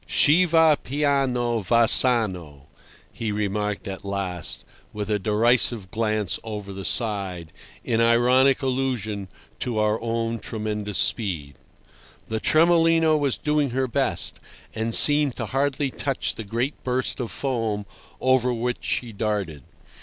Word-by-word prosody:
"Chi 165 +5 +4
va 160 -2 +4
piano 130 -4 0
va 115 +4 +2
sano," 95 - +3 0.5
he 110 -2 -4
remarked 105 0 -2
at 95 0 -7
last, 95 -4 -4 0.3
with 105 0 -4
a 105 - +1
derisive 110 -1 +1
glance 110 -4 -1
over 105 -3 -7
the 95 0 -7
side, 95 -8 -1 0.3
in 115 -1 0
ironic 125 +4 +3
allusion 125 -7 -2 0.3
to 120 -3 -2
our 105 0 +1
own 115 0 -2
tremendous 105 -1 -4
speed. 85 - -1 0.8
The 110 0 -2
Tremolino 165 +1 +4
was 145 -4 0
doing 150 -2 0
her 130 +2 -1
best, 120 - -1 0.3
and 110 +1 -1
seemed 145 -3 +5
to - - -4
hardly 135 0 -1
touch 135 0 -2
the 110 - -8
great 120 +7 -3
burst 130 +1 -2
of 120 -3 -3
foam 115 -6 -2 0.3
over 130 -1 +2
which 120 +1 -2
she 120 -2 -2
darted. 100 -8 -3
115 Hz, 130 wpm, -23 LUFS, 105-130 Hz, 0.8 s, seemed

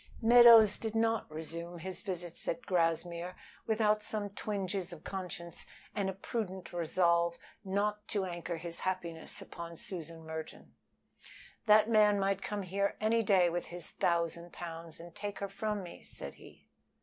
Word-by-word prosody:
Meadows 230 -2 +8
did 225 -1 -3
not 225 -2 +1
resume 165 +2 -6
his 185 +2 -5
visits 175 -4 -5
at 250 - -2
Grassmere 170 0 0 0.3
without 215 -1 +3
some 210 -1 -2
twinges 195 -2 -3
of 170 -2 -10
conscience 180 -3 -5 0.3
and 195 -2 0
a - - -2
prudent 190 -3 -4
resolve 170 0 +2 0.3
not 210 +2 -1
to 200 -3 0
anchor 175 -1 -4
his 170 +1 -5
happiness 175 -3 -3
upon 170 -1 -8
Susan 165 -3 -5
Merton. 160 0 -7 0.9
"That 215 0 +7
man 210 -2 +5
might 195 0 +1
come 205 -1 -3
here 200 +2 0
any 225 +2 +3
day 190 -4 +5
with 175 +1 -2
his 175 -1 -4
thousand 170 0 0
pounds 165 -1 -7
and 170 0 -10
take 205 +2 -5
her 200 - -3
from 210 0 -3
me," 175 - -10
said - - -8
he. - - -16
185 Hz, 150 wpm, -33 LUFS, 170-210 Hz, 0.9 s, Meadows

